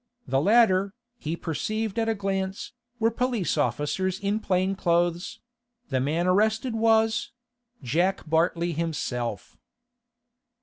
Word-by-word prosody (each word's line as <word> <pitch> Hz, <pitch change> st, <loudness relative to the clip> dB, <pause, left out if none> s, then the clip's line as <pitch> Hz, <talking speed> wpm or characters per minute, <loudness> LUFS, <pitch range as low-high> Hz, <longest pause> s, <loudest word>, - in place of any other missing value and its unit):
The 135 Hz, 0 st, +1 dB
latter, 200 Hz, 0 st, +4 dB, 0.2 s
he 155 Hz, +2 st, -3 dB
perceived 215 Hz, +7 st, -2 dB
at 225 Hz, 0 st, +1 dB
a 225 Hz, -, +1 dB
glance, 195 Hz, -1 st, -3 dB, 0.3 s
were 225 Hz, 0 st, +2 dB
police 240 Hz, -5 st, 0 dB
officers 175 Hz, +5 st, -1 dB
in 200 Hz, +2 st, 0 dB
plain 190 Hz, -2 st, +1 dB
clothes; 175 Hz, -1 st, 0 dB, 0.5 s
the 130 Hz, -2 st, 0 dB
man 155 Hz, +6 st, 0 dB
arrested 220 Hz, +6 st, +2 dB
was—Jack 225 Hz, -, 0 dB
Bartley 170 Hz, +2 st, +1 dB
himself. 125 Hz, -, -3 dB
190 Hz, 105 wpm, -26 LUFS, 165-220 Hz, 0.5 s, latter